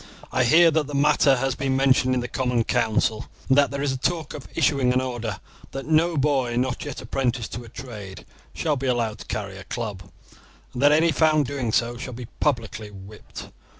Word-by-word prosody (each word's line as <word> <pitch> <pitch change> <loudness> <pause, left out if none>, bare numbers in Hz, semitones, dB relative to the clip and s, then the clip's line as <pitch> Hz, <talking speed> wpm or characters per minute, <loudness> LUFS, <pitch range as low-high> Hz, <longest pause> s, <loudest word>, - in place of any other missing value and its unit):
I 125 - +2
hear 165 +6 +6
that 155 -2 0
the 145 - -5
matter 140 -1 +4
has 135 +1 0
been 135 0 -1
mentioned 130 -1 +3
in 125 - 0
the 120 - -4
Common 125 -2 0
Council, 110 -2 0 0.2
and 130 - +5
that 140 - +4
there 140 0 -3
is 145 - +1
a 130 - -2
talk 160 +1 -1
of 145 - -8
issuing 135 -4 +2
an 125 - +2
order 120 -6 -4 0.3
that 135 0 -5
no 160 +1 +2
boy 135 -4 +1
not 125 +1 -1
yet 145 -3 -6
apprenticed 125 -3 -2
to 120 +1 -6
a - - -12
trade 105 -6 -9 0.3
shall 155 -3 -1
be 135 +1 -3
allowed 115 -4 0
to - - -10
carry 100 -2 -4
a - - -9
club, 105 -3 -5 0.7
and 125 - -4
that 145 +1 +6
any 160 +2 +4
found 155 +1 +3
doing 130 -4 -3
so 120 +1 0
shall 125 +1 -6
be 120 +1 -7
publicly 115 -6 -1
whipped." 100 +1 -11
130 Hz, 210 wpm, -24 LUFS, 115-140 Hz, 0.7 s, hear